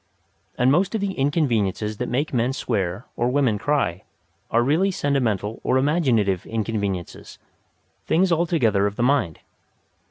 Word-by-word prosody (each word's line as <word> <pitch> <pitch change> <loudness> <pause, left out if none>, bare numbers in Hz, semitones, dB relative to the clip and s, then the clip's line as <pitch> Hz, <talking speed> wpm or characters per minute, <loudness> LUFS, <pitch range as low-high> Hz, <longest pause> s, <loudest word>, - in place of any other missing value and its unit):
And 125 +2 +3
most 185 +8 +2
of 220 - -1
the 200 -1 -1
inconveniences 115 - 0
that 125 - -3
make 140 +5 -1
men 125 +1 +1
swear 100 -5 -2
or 120 +1 0
women 125 -6 +1
cry 120 - 0 0.5
are 115 +1 +2
really 160 +9 +2
sentimental 120 - -1
or 130 - +2
imaginative 130 - +1
inconveniences 100 -5 -4 0.7
things 180 +2 +2
altogether 155 - +2
of 100 - -5
the 120 - -1
mind. 125 - +1
125 Hz, 135 wpm, -23 LUFS, 105-145 Hz, 0.7 s, And